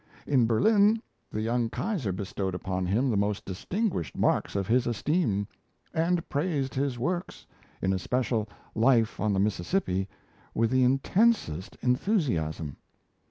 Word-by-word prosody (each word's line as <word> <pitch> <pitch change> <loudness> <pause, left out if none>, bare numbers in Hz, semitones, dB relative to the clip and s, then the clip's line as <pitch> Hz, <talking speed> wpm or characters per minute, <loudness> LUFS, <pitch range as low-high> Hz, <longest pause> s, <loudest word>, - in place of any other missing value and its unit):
In 130 -5 +3
Berlin, 205 - +4 0.3
the 110 - -3
young 115 +1 0
Kaiser 170 - -2
bestowed 95 0 -3
upon 95 0 -2
him 120 +8 +2
the - - +1
most 100 0 0
distinguished 170 - -2
marks - - +1
of 100 -1 0
his 120 +4 +2
esteem; 120 - 0 0.5
and 165 +1 +1
praised 140 -4 -1
his 135 -2 -1
works, 175 +8 -3 0.4
in 95 - +2
especial 110 +2 -1 0.2
'Life 115 -1 +3
on 110 - +1
the 95 - +1
Mississippi', 95 - 0 0.5
with 115 0 +2
the 130 0 +4
intensest 135 - +2
enthusiasm. 125 - 0
120 Hz, 130 wpm, -28 LUFS, 100-150 Hz, 0.5 s, Berlin